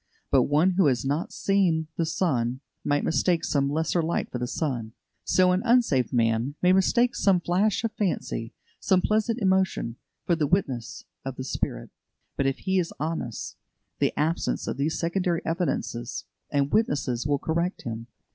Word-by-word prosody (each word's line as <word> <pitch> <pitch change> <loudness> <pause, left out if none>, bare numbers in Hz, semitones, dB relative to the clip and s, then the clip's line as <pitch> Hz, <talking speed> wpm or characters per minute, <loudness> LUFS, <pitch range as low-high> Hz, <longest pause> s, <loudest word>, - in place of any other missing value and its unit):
But 135 -2 +4
one 155 +6 +4
who 185 -3 +3
has 130 -1 +1
not 145 +5 -1
seen 185 -5 +1
the 165 - 0
sun 130 -8 0 0.2
might 145 0 +1
mistake 165 +3 +1
some 140 -1 +1
lesser 160 +3 +1
light 165 +1 -1
for 125 - -3
the 125 - -2
sun. 120 -6 -3 0.3
So 185 -1 +4
an 180 +1 +2
unsaved 230 - +3
man 115 +3 +1
may 180 0 +4
mistake 235 +6 +3
some 190 -3 +3
flash 190 +6 +1
of 230 - 0
fancy, 170 - -2 0.2
some 185 -2 +2
pleasant 220 +2 +1
emotion, 190 - +1 0.3
for 170 - +2
the 155 -3 0
witness 135 - -1 0.2
of 135 -1 -5
the 130 - -5
Spirit. - - -3 0.4
But 140 - +1
if 135 - 0
he 190 -1 +2
is 170 - -1
honest, 150 -7 -4 0.4
the - - +2
absence 160 +3 0
of - - -2
these 150 +3 0
secondary 175 0 0
evidences 160 -7 -2 0.2
and 140 -1 +1
witnesses 140 - +1
will 145 -1 +2
correct 170 +5 -2
him. 115 0 -5
160 Hz, 165 wpm, -26 LUFS, 135-185 Hz, 0.4 s, But